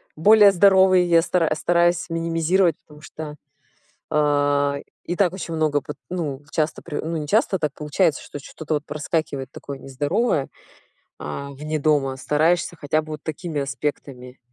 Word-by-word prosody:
Более 205 +5 +7
здоровый 190 -1 +5
я 170 -1 +4
стара 165 -1 +1
стараюсь 175 +2 +1
минимизировать, 165 +1 +1
потому 150 0 -17
что, 155 0 -8 0.8
э, 145 -1 +1 0.2
и 175 - -3
так 180 -3 +2
очень 175 -3 -5
много, 155 -2 +1
вот, 150 - -6
ну, 150 -6 -4
часто 155 -1 -1
при 155 -4 -6
ну, 160 +1 -3
не 150 - -4
часто 205 0 +2
так 150 -3 -1
получается, 150 +1 0
что - - -8
что-то 155 +2 -5
вот 150 0 -2
проскакивает 150 -3 -3
такое 140 -1 -8
нездоровое, 145 - -1 0.7
а, 140 0 -6
вне 150 +3 -4
дома. 140 -3 +1
Стараешься 160 +6 +1
хотя 155 +2 0
бы 155 0 -9
вот 150 - -9
такими 160 -1 -4
аспектами 135 -2 -5
155 Hz, 155 wpm, -22 LUFS, 145-175 Hz, 0.8 s, Более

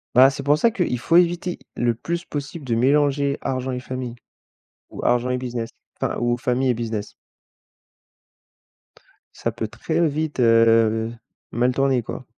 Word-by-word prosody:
Bah, 130 +2 +8
c'est 140 0 -6
pour 145 +2 +3
ça 230 +7 +3
qu'il 180 - -1
faut 165 +8 +3
éviter 175 0 +1 0.2
le 120 -1 +1
plus 170 +9 -4
possible 145 +1 -6
de 120 -3 -2
mélanger 140 +3 +2
argent 130 -1 -2
et 125 - -4
famille 125 -1 -5 0.7
ou - - -7
argent 120 +1 +2
et 125 - 0
business, 120 -2 -4 0.3
enfin, - - -1
ou 120 0 +1
famille 125 +1 +1
et - - +2
business. 110 -3 -4 2.2
Ça - - -2
peut 110 - -4
très 165 +8 0
vite, 155 -1 -3
heu, 115 -1 +4 0.4
mal 125 +2 +2
tourner, 135 -1 +2
quoi. 130 - -7
130 Hz, 155 wpm, -22 LUFS, 120-145 Hz, 2.2 s, Bah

